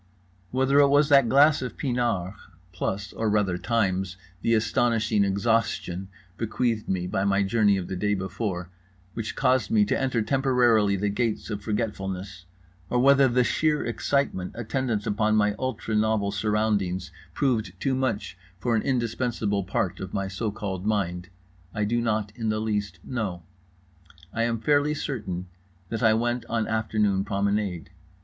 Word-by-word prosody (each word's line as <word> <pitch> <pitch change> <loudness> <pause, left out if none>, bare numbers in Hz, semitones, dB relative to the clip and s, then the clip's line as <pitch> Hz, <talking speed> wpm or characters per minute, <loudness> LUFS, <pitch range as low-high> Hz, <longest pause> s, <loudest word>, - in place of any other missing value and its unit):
Whether 130 +2 +3
it 140 - +7
was 145 +1 +4
that 140 -5 +6
glass 145 +3 +5
of 125 - -5
pinard 120 -8 -1 0.4
(plus, 95 +3 -3
or 110 - -1
rather 100 -4 +1
times, 95 -3 0 0.2
the 115 - +2
astonishing 110 -1 +2
exhaustion 100 -2 0 0.3
bequeathed 115 0 -1
me 90 -2 0
by 95 +2 -1
my 100 0 +2
journey 100 0 +3
of 90 - -4
the 95 - -4
day 105 +3 0
before) 95 -2 -4 0.4
which 115 -2 -4
caused 130 +1 +2
me 215 -1 +4
to - - 0
enter 130 -4 +1
temporarily 120 -6 +3
the 100 +2 0
gates 115 +1 -2
of 105 -1 -3
forgetfulness, 95 -4 -4 0.4
or 125 - +1
whether 135 +2 +6
the 125 0 +3
sheer 150 +5 +1
excitement 120 -6 -1
attendant 120 -2 -2
upon 110 +1 +1
my 105 -1 +3
ultra 130 -3 -3
novel 105 -2 +1
surroundings 105 -3 0 0.2
proved 110 -10 0
too 135 - 0
much 130 -9 -1 0.2
for 115 +5 0
an 105 - +2
indispensable 115 -5 -1
part 95 -1 -2
of 95 0 -6
my 100 0 -1
so 95 +4 -3
called 100 -3 -4
mind—I 90 -1 -4
do 120 +3 0
not 110 -3 -1
in 115 -2 -2
the 110 0 0
least 105 -4 -2
know. 105 -9 -4 0.9
I 115 - +1
am 115 -1 -1
fairly 145 +3 +2
certain 105 - -4 0.4
that 115 - -3
I 110 -2 +5
went 120 +1 0
on 115 -1 0
afternoon 110 -3 +1
promenade. 100 -3 -1
110 Hz, 155 wpm, -26 LUFS, 95-120 Hz, 0.9 s, it